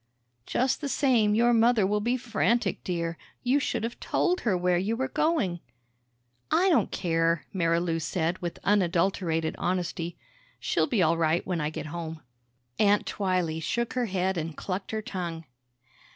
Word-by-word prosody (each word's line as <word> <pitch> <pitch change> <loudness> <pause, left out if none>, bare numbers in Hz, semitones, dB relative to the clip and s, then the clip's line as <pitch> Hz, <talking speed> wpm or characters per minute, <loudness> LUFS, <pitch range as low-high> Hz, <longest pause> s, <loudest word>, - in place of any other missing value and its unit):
"Just 260 +1 0
the 285 - -2
same, 235 -7 +3
your 240 +2 +4
mother 230 -2 +4
will 210 +2 +1
be 240 +4 +1
frantic, 235 -1 0
dear. 170 -2 -3 0.2
You 255 +3 +3
should 240 -5 -2
have 230 +1 -4
told 365 0 0
her 205 -6 +1
where 180 0 +2
you 210 +5 -1
were 265 +1 0
going." 255 - 0 0.9
"I 375 +3 +3
don't 245 - +3
care," 165 -1 0
Marilou 170 -2 +1
said 170 +2 -1
with 175 -1 -4
unadulterated 175 -4 +1
honesty. 175 -1 -2 0.4
"She'll - - +1
be 230 - +2
all 165 +1 +3
right 165 +1 +1
when 175 -3 -1
I 150 - 0
get 155 0 -6
home." 160 0 -6 0.6
Aunt 205 -1 +4
Twylee 180 -5 -1
shook 235 +8 -1
her 250 -2 0
head 185 -1 0
and 160 -1 -5
clucked 190 +1 -4
her 220 -1 -3
tongue. 175 -7 -5
185 Hz, 160 wpm, -27 LUFS, 165-230 Hz, 0.9 s, your